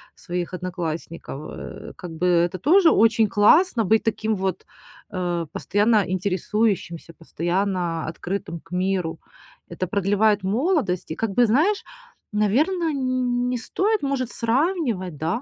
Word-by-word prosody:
своих 175 Hz, -1 st, -4 dB
одноклассников. 170 Hz, -4 st, -5 dB
Э, -, -, -9 dB
как 175 Hz, -2 st, -8 dB
бы 160 Hz, +3 st, -1 dB
это 175 Hz, +1 st, +2 dB
тоже 330 Hz, -, +5 dB
очень 220 Hz, 0 st, +4 dB
классно 235 Hz, -, +4 dB
быть 220 Hz, +3 st, +3 dB
таким 220 Hz, 0 st, 0 dB
вот, 190 Hz, -1 st, -3 dB, 0.5 s
э, 175 Hz, -3 st, -2 dB
постоянно 210 Hz, +1 st, +2 dB
интересующимся, 185 Hz, -2 st, -1 dB
постоянно 175 Hz, 0 st, -2 dB
открытым 170 Hz, +1 st, -4 dB
к 165 Hz, -, -25 dB
миру. 180 Hz, -3 st, -1 dB, 0.5 s
Это 175 Hz, +1 st, -3 dB
продлевает 205 Hz, +2 st, +2 dB
молодость, 230 Hz, -, 0 dB
и -, -, -2 dB
как 225 Hz, +1 st, -2 dB
бы 245 Hz, +4 st, +4 dB
знаешь, 315 Hz, -, +2 dB, 0.5 s
наверное, 300 Hz, -, +1 dB
н 255 Hz, -3 st, 0 dB
не 250 Hz, -, -1 dB
стоит 390 Hz, -, -1 dB
может 270 Hz, -3 st, -1 dB
сравнивать, 235 Hz, -, -1 dB
да. 165 Hz, -, -1 dB
205 Hz, 130 wpm, -23 LUFS, 180-245 Hz, 0.5 s, тоже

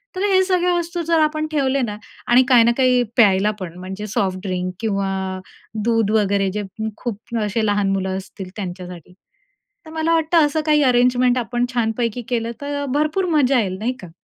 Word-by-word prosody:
तर 370 Hz, -, -3 dB
हे 375 Hz, 0 st, +5 dB
सगळ्या 360 Hz, -1 st, +1 dB
वस्तू 345 Hz, 0 st, -2 dB
जर 330 Hz, -1 st, +3 dB
आपण 310 Hz, 0 st, 0 dB
ठेवले 275 Hz, -2 st, +1 dB
ना, 210 Hz, -3 st, -3 dB, 0.3 s
आणि 245 Hz, +2 st, +6 dB
काही 245 Hz, -2 st, +7 dB
ना 235 Hz, -, +4 dB
काही 255 Hz, -2 st, +3 dB
प्यायला 205 Hz, -2 st, +4 dB
पण, 175 Hz, -3 st, -7 dB
म्हणजे 190 Hz, +3 st, -6 dB
सॉफ्ट 190 Hz, -2 st, -1 dB
ड्रिंक 185 Hz, 0 st, -2 dB
किंवा 200 Hz, -3 st, -1 dB, 0.7 s
दूध 225 Hz, -2 st, +1 dB
वगैरे, 200 Hz, -2 st, +2 dB
जे 210 Hz, +2 st, -3 dB, 0.3 s
खूप 235 Hz, 0 st, -6 dB
असे 215 Hz, +2 st, -1 dB
लहान 205 Hz, -1 st, +1 dB
मुलं 190 Hz, -1 st, -1 dB
असतील 190 Hz, -1 st, -8 dB
त्यांच्यासाठी. 180 Hz, -3 st, -8 dB, 0.7 s
तर 315 Hz, -, -11 dB
मला 320 Hz, +1 st, 0 dB
वाटतं 325 Hz, -1 st, +3 dB
असं 310 Hz, +2 st, -1 dB
काही 300 Hz, -2 st, +4 dB
अरेंजमेंट 250 Hz, 0 st, +3 dB
आपण 240 Hz, +1 st, -1 dB
छानपैकी 230 Hz, 0 st, -1 dB
केलं 230 Hz, -2 st, -1 dB
तर, 285 Hz, 0 st, -3 dB
भरपूर 305 Hz, +6 st, +1 dB
मजा 265 Hz, -2 st, +3 dB
येईल, 190 Hz, -3 st, -2 dB
नाही 240 Hz, +4 st, -1 dB
का. 180 Hz, -, -10 dB
235 Hz, 175 wpm, -20 LUFS, 195-285 Hz, 0.7 s, काही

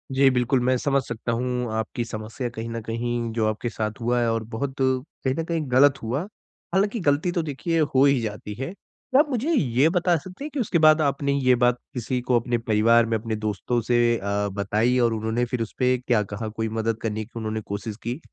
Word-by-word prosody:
जी 135 Hz, 0 st, +6 dB
बिल्कुल, 125 Hz, +1 st, +2 dB
मैं 130 Hz, +1 st, +3 dB
समझ 140 Hz, +1 st, +1 dB
सकता 115 Hz, 0 st, -4 dB
हूँ 125 Hz, 0 st, -1 dB
आपकी 110 Hz, +2 st, -2 dB
समस्या 115 Hz, +2 st, -5 dB
कहीं 115 Hz, -1 st, -6 dB
न 115 Hz, 0 st, -4 dB
कहीं 115 Hz, +1 st, -2 dB
जो 110 Hz, -1 st, +1 dB
आपके 110 Hz, +2 st, -2 dB
साथ 110 Hz, -2 st, -4 dB
हुआ 120 Hz, +1 st, +1 dB
है 120 Hz, -, +2 dB
और 115 Hz, 0 st, -1 dB
बहुत 130 Hz, +4 st, -3 dB
कहीं 130 Hz, +1 st, -1 dB
न -, -, 0 dB
कहीं 165 Hz, -1 st, -1 dB
ग़लत 135 Hz, +1 st, +5 dB
हुआ। 120 Hz, +5 st, -1 dB, 0.5 s
हालाँकि 205 Hz, +4 st, +1 dB
ग़लती 150 Hz, +1 st, +1 dB
तो 175 Hz, -, 0 dB
देखिए 160 Hz, +3 st, -1 dB
हो 140 Hz, -3 st, +3 dB
ही 140 Hz, -2 st, +4 dB
जाती 105 Hz, -1 st, -5 dB
है। 135 Hz, +6 st, -3 dB
तो 260 Hz, +5 st, -2 dB
आप 300 Hz, 0 st, +4 dB
मुझे 270 Hz, +5 st, 0 dB
ये 140 Hz, -, +3 dB
बता 180 Hz, 0 st, +2 dB
सकते 185 Hz, -, -9 dB
हैं -, -, -4 dB
कि 290 Hz, -, -2 dB
उसके 210 Hz, -7 st, +1 dB
बाद 155 Hz, +1 st, +6 dB
आपने 140 Hz, -1 st, +1 dB
ये 130 Hz, -2 st, +3 dB
बात 125 Hz, 0 st, +3 dB, 0.2 s
किसी 125 Hz, +1 st, -2 dB
को 125 Hz, -1 st, +2 dB
अपने 120 Hz, +1 st, -1 dB
परिवार 115 Hz, +1 st, +3 dB
में, 115 Hz, 0 st, 0 dB
अपने 110 Hz, 0 st, -3 dB
दोस्तों 110 Hz, +3 st, -1 dB
से 120 Hz, 0 st, +2 dB
अ, 100 Hz, 0 st, -1 dB
बताई 105 Hz, +5 st, +1 dB
और 120 Hz, -2 st, +3 dB
उन्होंने 110 Hz, +2 st, -1 dB
फिर 120 Hz, 0 st, -3 dB
उस 115 Hz, -, -4 dB
पे 125 Hz, -1 st, +3 dB
क्या 120 Hz, -3 st, +1 dB
कहा? 105 Hz, +2 st, -5 dB
कोई 110 Hz, +1 st, -3 dB
मदद 110 Hz, 0 st, -1 dB
करने 110 Hz, -1 st, -2 dB
की 115 Hz, -, -26 dB
उन्होंने 110 Hz, 0 st, -3 dB
कोशिश 100 Hz, +1 st, -5 dB
की? 120 Hz, +5 st, -3 dB
120 Hz, 225 wpm, -24 LUFS, 110-140 Hz, 0.5 s, जी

